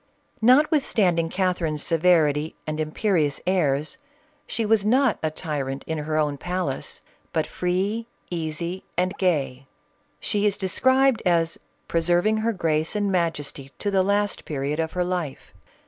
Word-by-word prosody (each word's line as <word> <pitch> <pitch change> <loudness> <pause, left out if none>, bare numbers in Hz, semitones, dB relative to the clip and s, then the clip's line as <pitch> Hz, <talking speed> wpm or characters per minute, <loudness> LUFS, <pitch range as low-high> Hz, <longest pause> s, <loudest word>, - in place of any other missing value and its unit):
Notwithstanding 225 - +3
Cath 185 0 0
erine's 155 -2 -1
severity 160 -3 +2
and 155 0 -3
imperious 155 -1 0
airs, 155 -6 0 0.5
she 225 - -1
was 215 -1 +3
not 250 +2 +3
a 155 - 0
tyrant 145 -4 -4
in 160 -1 -3
her 155 +1 -2
own 145 -2 0
palace, 180 -6 -3 0.3
but - - 0
free, 195 +6 -1 0.2
easy, 170 +2 -3
and 185 +1 +1
gay. 135 -8 0 0.5
She 205 0 +1
is 200 - +1
de 190 - -2
scribed 260 +1 +3
as 170 -2 +2
" - - -42
preserving 175 +6 +2
her 225 +2 +1
grace 160 -3 0
and 205 -1 0
majesty 150 -6 -2
to 205 - -1
the 190 -1 +3
last 205 +2 0
period 145 +1 -3
of 160 0 -1
her 180 - 0
life. 175 -6 -4
175 Hz, 145 wpm, -24 LUFS, 155-200 Hz, 0.5 s, Notwithstanding